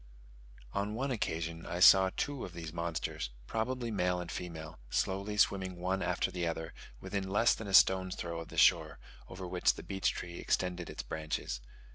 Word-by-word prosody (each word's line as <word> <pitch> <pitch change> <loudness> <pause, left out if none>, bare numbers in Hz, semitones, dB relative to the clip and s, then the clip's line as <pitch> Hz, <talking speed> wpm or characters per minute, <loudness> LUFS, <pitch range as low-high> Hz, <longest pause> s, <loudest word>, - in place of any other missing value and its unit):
On 105 +2 -1
one 135 +3 -1
occasion 85 -7 -2
I 85 +1 -4
saw 95 +1 +8
two 145 -3 -2
of 90 - -7
these 80 -2 -7
monsters, 85 -7 -3 0.2
probably 120 - -2
male 90 -3 +1
and 85 -2 -5
female, 80 -5 -6
slowly 100 +2 -1
swimming 95 -3 +2
one 95 +2 -1
after - - 0
the 90 -1 -2
other, 80 -1 -4 0.3
within 100 -2 -3
less 105 +4 +4
than 110 - -6
a 95 - -5
stone's 95 -1 +5
throw 85 -1 -4
of 85 - -7
the - - -10
shore, - - +4 0.3
over 95 0 -7
which 90 0 +2
the - - -8
beech 95 -1 0
tree 85 0 -6
extended 90 -2 -1
its - - -5
branches. 75 -6 -4
90 Hz, 180 wpm, -33 LUFS, 85-100 Hz, 0.3 s, saw